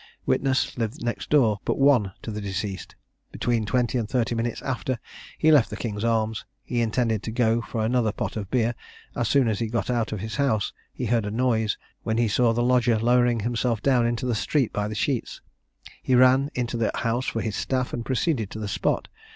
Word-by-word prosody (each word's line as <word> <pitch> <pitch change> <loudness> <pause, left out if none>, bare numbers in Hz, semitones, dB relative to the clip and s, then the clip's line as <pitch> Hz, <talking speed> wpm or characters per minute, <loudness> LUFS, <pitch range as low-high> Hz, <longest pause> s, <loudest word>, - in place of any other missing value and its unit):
Witness 130 -2 +1
lived 115 0 -3
next 120 0 -3
door 115 -9 +3
but - - -1
one 135 -8 +4
to 115 - -5
the 105 0 -5
deceased. 95 0 -4 0.4
Between 115 -3 -1
twenty 125 +3 +1
and 110 -3 -3
thirty 120 -2 0
minutes 115 0 -2
after 130 -1 -2 0.4
he 155 - +4
left 145 -7 +5
the - - -6
King's 105 -2 -4
Arms, 110 -1 0 0.2
he 120 -1 -1
intended 115 -2 0
to 110 - -5
go 115 0 +2
for 115 -1 -3
another 115 -2 +1
pot - - -4
of 100 -3 -4
beer; 120 -2 +1 0.4
as 120 - 0
soon 135 -2 +3
as 110 -3 0
he 115 - -1
got 115 +2 -1
out 115 -2 0
of 105 - -3
his 110 +5 -5
house 130 -8 +1 0.2
he 125 - -4
heard 115 -2 +1
a - - -1
noise, 110 -2 +1 0.2
when 110 0 -1
he 120 -1 +3
saw 115 +4 +3
the 120 +1 0
lodger 120 -2 +3
lowering 120 0 +3
himself 120 0 0
down 125 -4 +3
into 120 +1 -2
the 125 - 0
street 130 +3 0
by 105 0 -1
the 110 - -5
sheets. 125 +3 -2 0.6
He 130 - +2
ran 130 +3 +5
into 120 -1 -2
the 115 -2 +1
house 120 +3 -1
for 115 - -1
his 105 -3 -3
staff, 130 +3 -1
and 120 - -3
proceeded 130 - 0
to 110 - -7
the 105 - -3
spot. 100 - -1
115 Hz, 215 wpm, -25 LUFS, 110-125 Hz, 0.6 s, left